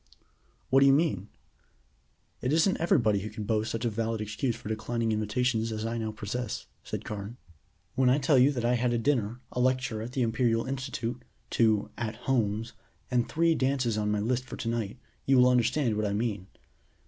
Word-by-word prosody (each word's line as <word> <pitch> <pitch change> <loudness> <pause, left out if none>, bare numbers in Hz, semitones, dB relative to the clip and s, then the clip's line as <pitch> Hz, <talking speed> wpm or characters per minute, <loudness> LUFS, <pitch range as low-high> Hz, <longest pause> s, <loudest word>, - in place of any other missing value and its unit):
"What 135 - +6
do 140 - +6
you 135 - +7
mean?" 140 - +1 1.1
"It 125 - 0
isn't 165 +5 +3
everybody 115 -11 +3
who 105 +3 -5
can 105 0 -6
boast 110 +1 0
such 115 +1 -3
a - - +2
valid 115 +1 -2
excuse 110 +3 -2
for - - -10
declining 110 +1 -1
invitations 110 +2 0
as 110 0 -3
I 115 +1 -2
now 110 -1 -2
possess," 110 +2 -4 0.2
said - - -5
Carne. 105 +3 -6 0.6
"When 130 0 +3
I 130 - +4
tell 140 -1 +3
you 135 +3 +6
that 120 -3 -2
I 120 - +3
had 120 0 +1
a - - +2
dinner, 120 -2 0
a - - -3
lecture 125 -3 +1
at 120 +3 -6
the 130 - +1
Imperial 115 0 +1
institute, 130 -3 -4 0.3
two 110 -3 +2
'at 115 -2 -3
homes,' 115 -3 -1 0.4
and 120 -1 +1
three 165 +1 +3
dances 130 -5 +1
on 105 -1 0
my 105 0 +1
list 125 +4 0
for - - -8
to - - -5
night, 115 -1 -2 0.3
you 135 -1 +5
will 125 0 +6
understand 125 0 +2
what 105 0 0
I 100 - -1
mean. 105 -3 -2
115 Hz, 195 wpm, -29 LUFS, 110-130 Hz, 1.1 s, you